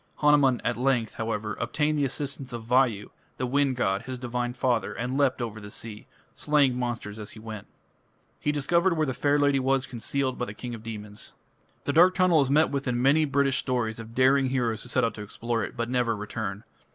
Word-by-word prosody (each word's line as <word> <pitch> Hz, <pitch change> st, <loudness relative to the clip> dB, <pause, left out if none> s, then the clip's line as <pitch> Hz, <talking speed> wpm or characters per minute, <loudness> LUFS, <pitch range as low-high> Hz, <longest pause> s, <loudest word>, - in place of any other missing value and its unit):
Hanuman 145 Hz, -4 st, +4 dB
at 120 Hz, -, -1 dB
length, 125 Hz, -3 st, +1 dB
however, 105 Hz, -2 st, -3 dB
obtained 150 Hz, 0 st, 0 dB
the 140 Hz, -, +2 dB
assistance 135 Hz, 0 st, -4 dB
of 120 Hz, -1 st, -5 dB
Vayu, 120 Hz, -3 st, +2 dB, 0.3 s
the 130 Hz, -, -1 dB
wind 135 Hz, +1 st, +1 dB
god, 95 Hz, -5 st, 0 dB
his 130 Hz, 0 st, -6 dB
divine 120 Hz, 0 st, -2 dB
father, 125 Hz, -2 st, 0 dB
and 125 Hz, +2 st, -3 dB
leapt 135 Hz, -3 st, +2 dB
over 110 Hz, -2 st, -6 dB
the 105 Hz, -, -9 dB
sea, 105 Hz, 0 st, -8 dB, 0.3 s
slaying 145 Hz, -4 st, +2 dB
monsters 120 Hz, -4 st, -4 dB
as 105 Hz, -, -7 dB
he 110 Hz, -, -11 dB
went. 110 Hz, -2 st, -8 dB, 0.7 s
He 150 Hz, -, 0 dB
discovered 170 Hz, +5 st, +2 dB
where 155 Hz, -, +2 dB
the 130 Hz, -, -2 dB
fair 145 Hz, +3 st, +2 dB
lady 145 Hz, -1 st, +3 dB
was 135 Hz, 0 st, +1 dB
concealed 130 Hz, +2 st, -2 dB
by 125 Hz, -, 0 dB
the 105 Hz, -, -8 dB
king 120 Hz, +1 st, -6 dB
of 115 Hz, -, -7 dB
demons. 105 Hz, -2 st, -8 dB, 0.5 s
The 140 Hz, -, -1 dB
dark 180 Hz, +4 st, +6 dB
tunnel 180 Hz, -4 st, +4 dB
is 135 Hz, -, 0 dB
met 155 Hz, +3 st, +4 dB
with 140 Hz, -1 st, -2 dB
in 120 Hz, -1 st, 0 dB
many 140 Hz, +5 st, +4 dB
British 140 Hz, -1 st, +2 dB
stories 115 Hz, -4 st, -1 dB
of 115 Hz, 0 st, -10 dB
daring 135 Hz, +1 st, +4 dB
heroes 120 Hz, -4 st, -1 dB
who 125 Hz, -, -9 dB
set -, -, +1 dB
out 115 Hz, -, +1 dB
to 105 Hz, -, -8 dB
explore 115 Hz, +2 st, -3 dB
it, 105 Hz, -, -7 dB
but 115 Hz, 0 st, -1 dB
never 125 Hz, -2 st, +1 dB
return. 105 Hz, -1 st, -5 dB
125 Hz, 210 wpm, -27 LUFS, 115-140 Hz, 0.7 s, dark